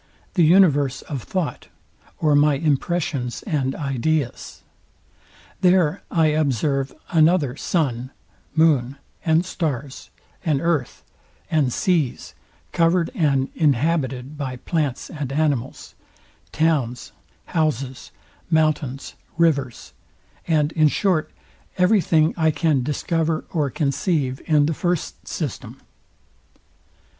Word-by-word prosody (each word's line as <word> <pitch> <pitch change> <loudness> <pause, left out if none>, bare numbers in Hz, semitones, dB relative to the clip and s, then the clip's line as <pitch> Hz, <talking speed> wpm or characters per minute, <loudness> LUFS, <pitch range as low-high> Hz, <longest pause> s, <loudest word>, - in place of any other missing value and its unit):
the 175 - +3
universe 145 -6 +4
of 140 -4 -5
thought, 180 +4 -4 0.5
or 155 -2 +2
my 145 0 +4
impressions 145 -3 -1
and 140 -8 -1
ideas. 140 -1 -2 1.0
There 180 -4 +3
I 160 -2 +3
observe 140 -2 0 0.2
another 160 -5 +3
sun, 130 -7 -1 0.5
moon 145 -5 +3 0.3
and 160 +2 +2
stars; 145 -7 -4 0.3
an 155 -6 +1
earth, 160 -5 -1 0.5
and 145 -5 +2
seas, 160 -4 -1 0.4
covered 170 0 +2
and 145 - +1
inhabited 145 -2 0
by 130 -3 -3
plants 145 -1 -2
and 145 -4 -5
animals; 140 -4 -1 0.6
towns, 145 -7 0 0.3
houses, 140 -5 -2 0.4
mountains, 155 -4 0 0.2
rivers; 140 -7 0 0.5
and 155 -2 +2
in 155 -2 +4
short 175 0 +1 0.5
every 185 +3 +4
thing 160 -2 +2
I 160 -1 +2
can 155 -3 +1
discover 160 +4 -1
or 150 -5 0
conceive 140 -1 -1
in 150 -2 +4
the 160 - 0
first 175 +2 -3
system. - - -5
150 Hz, 100 wpm, -22 LUFS, 135-165 Hz, 1.0 s, universe